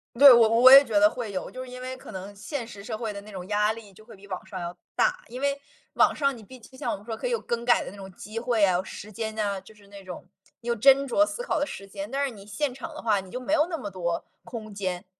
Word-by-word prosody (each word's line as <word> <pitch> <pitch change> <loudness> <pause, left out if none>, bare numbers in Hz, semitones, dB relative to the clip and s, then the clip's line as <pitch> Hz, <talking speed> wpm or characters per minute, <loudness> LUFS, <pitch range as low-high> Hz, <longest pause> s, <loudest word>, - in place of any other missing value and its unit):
对， 275 +3 +10
我 230 -2 +6
我 235 +3 +7
也 275 +1 +11
觉 220 -6 +1
得 205 +1 +6
会 230 -3 -5
有， 190 - -4
就 255 - -7
是 250 - -11
因 250 - -8
为 255 0 -5
可 260 - -12
能 195 +1 -8
现 230 +3 -5
实 200 -4 -10
社 220 0 -4
会 220 -2 -4
的 200 - -7
那 215 - -13
种 185 -2 -7
压 210 +1 +2
力 220 -3 -10
就 215 - -17
会 235 - -14
比 200 +1 -16
网 185 -2 -6
上 190 - -7
要 175 0 -6 0.2
大。 - - +1
因 250 +2 -7
为 280 0 0 0.4
网 - - +4
上 275 -3 0
你 225 - -12
毕 255 +4 -13
竟 - - -16
就 260 - -15
像 - - -2
我 - - -2
们 200 - -16
说 225 -1 -4
可 - - -3
以 - - -2
有 470 - +1
更 235 0 -3
改 240 0 +4
的 - - -6
那 205 - -12
种 195 -1 -10
机 210 +4 -10
会 230 -2 +1
啊， 185 -1 +1
时 205 +2 -9
间 220 +1 -4
呐， 200 -3 -1
就 220 - -16
是 205 -1 -20
那 200 -1 -12
种 185 0 -9 0.3
你 240 - -12
有 235 - +1
斟 275 +4 +5
酌 300 +5 +4
思 480 - -5
考 485 - -1
的 285 - +1
时 195 -8 -8
间。 200 +2 -7
但 280 +1 0
是 - - -2
你 205 -5 -12
现 265 +6 -2
场 320 +5 -8
的 310 - -8
话， 210 -4 +2
你 190 -1 -14
就 250 - -4
没 255 +4 -2
有 310 -1 +4
那 330 - -2
么 205 - -6
多 170 -3 -2 0.2
空 215 -3 -8
间。 185 -1 -3
220 Hz, 335 characters per minute, -26 LUFS, 200-255 Hz, 0.4 s, 也